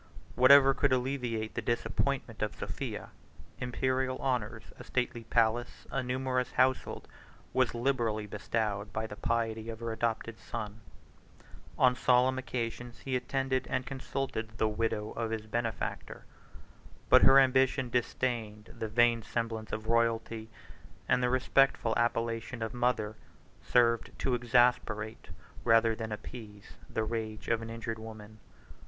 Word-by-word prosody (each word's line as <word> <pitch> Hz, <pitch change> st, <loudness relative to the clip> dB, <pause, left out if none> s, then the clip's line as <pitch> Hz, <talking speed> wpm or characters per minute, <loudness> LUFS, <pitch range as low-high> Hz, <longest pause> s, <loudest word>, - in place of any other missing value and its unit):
Whatever 135 Hz, +1 st, +7 dB
could 130 Hz, -, +1 dB
alleviate 125 Hz, -4 st, -1 dB
the 120 Hz, -, -2 dB
disappointment 120 Hz, +1 st, -1 dB
of 105 Hz, -6 st, -1 dB
Sophia, -, -, -5 dB, 0.5 s
Imperial 130 Hz, +1 st, -1 dB
honors, 120 Hz, -4 st, -2 dB, 0.2 s
a -, -, -8 dB
stately 120 Hz, -2 st, -2 dB
palace, 115 Hz, +1 st, +1 dB
a 135 Hz, -, 0 dB
numerous 125 Hz, 0 st, -1 dB
household, 130 Hz, 0 st, +1 dB, 0.5 s
was 130 Hz, -2 st, +2 dB
liberally 120 Hz, -4 st, 0 dB
bestowed 105 Hz, 0 st, -2 dB
by 110 Hz, +2 st, -2 dB
the 105 Hz, -, -7 dB
piety 115 Hz, 0 st, -1 dB
of 110 Hz, -1 st, -6 dB
her 115 Hz, -1 st, -3 dB
adopted 115 Hz, 0 st, -2 dB
son; 110 Hz, -1 st, -6 dB, 1.0 s
on 125 Hz, -1 st, +5 dB
solemn 130 Hz, +1 st, +3 dB
occasions 120 Hz, -2 st, -4 dB
he 130 Hz, -1 st, -1 dB
attended 130 Hz, +1 st, -1 dB
and 130 Hz, -1 st, -1 dB
consulted 130 Hz, -4 st, -4 dB
the 110 Hz, -, +2 dB
widow 110 Hz, 0 st, -1 dB
of 115 Hz, -1 st, -3 dB
his 110 Hz, -1 st, -3 dB
benefactor; 115 Hz, -1 st, -3 dB, 0.8 s
but -, -, +7 dB
her 135 Hz, -, +8 dB
ambition 130 Hz, -1 st, +3 dB
disdained 115 Hz, -3 st, -2 dB
the 110 Hz, -, -3 dB
vain 120 Hz, +1 st, +4 dB
semblance 115 Hz, -1 st, -3 dB
of 110 Hz, -, -4 dB
royalty, 115 Hz, -1 st, 0 dB, 0.6 s
and 125 Hz, -, +3 dB
the 125 Hz, -, +2 dB
respectful 130 Hz, -2 st, +3 dB
appellation 115 Hz, 0 st, -1 dB
of 110 Hz, -, -4 dB
mother 120 Hz, -3 st, 0 dB, 0.5 s
served 115 Hz, -2 st, +3 dB
to 130 Hz, -, 0 dB
exasperate, 120 Hz, -2 st, +1 dB, 0.4 s
rather 115 Hz, -1 st, +4 dB
than 110 Hz, 0 st, -5 dB
appease, 105 Hz, -2 st, -9 dB, 0.2 s
the 110 Hz, -, -1 dB
rage 110 Hz, -1 st, -4 dB
of 115 Hz, -1 st, +1 dB
an 115 Hz, -, -6 dB
injured 115 Hz, -1 st, -5 dB
woman. 110 Hz, -1 st, -10 dB
115 Hz, 135 wpm, -31 LUFS, 110-125 Hz, 1.0 s, her